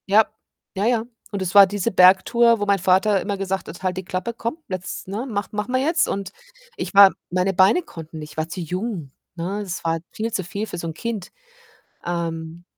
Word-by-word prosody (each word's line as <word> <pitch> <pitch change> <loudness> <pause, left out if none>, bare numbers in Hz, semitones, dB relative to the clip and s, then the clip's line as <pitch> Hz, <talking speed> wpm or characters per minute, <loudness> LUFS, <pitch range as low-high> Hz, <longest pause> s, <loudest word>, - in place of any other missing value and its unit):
Ja. 210 +2 +6 0.5
Ja, 195 +2 0
ja, 235 -1 +2 0.3
und 200 - -2
es 180 -2 -2
war 200 -1 +9
diese 205 +3 -1
Bergtour, 200 +6 +5
wo - - +1
mein 200 -1 +2
Vater 190 +3 +3
immer 200 -1 -2
gesagt 195 0 -3
hat: 175 - -10
„Halt 185 -1 -1
die 190 - -5
Klappe, 185 +6 -3
komm, 230 +5 -4
jetzt, 185 -1 -5
ne, 210 +6 -3
mach 205 -2 -3
machen 210 +4 -3
wir 255 - +2
jetzt.“ 325 +4 +2
Und 195 0 -3 0.5
ich - - -4
war 200 -1 +9 0.2
meine 185 +2 +1
Beine 190 - +5
konnten 165 - -10
nicht, 150 0 -8
ich 150 - -17
war 155 0 -1
zu 175 +3 -6
jung, 180 - -4 0.2
ne? 180 +4 -3
Es 185 -4 -5
war 165 0 0
viel 225 +1 -3
zu 190 -4 -2
viel 200 +4 -4
für 185 - -6
so 170 - -4
'n 160 - -4
Kind. 215 +1 -5 0.8
Ähm 165 -1 -4
195 Hz, 215 wpm, -22 LUFS, 175-210 Hz, 0.8 s, war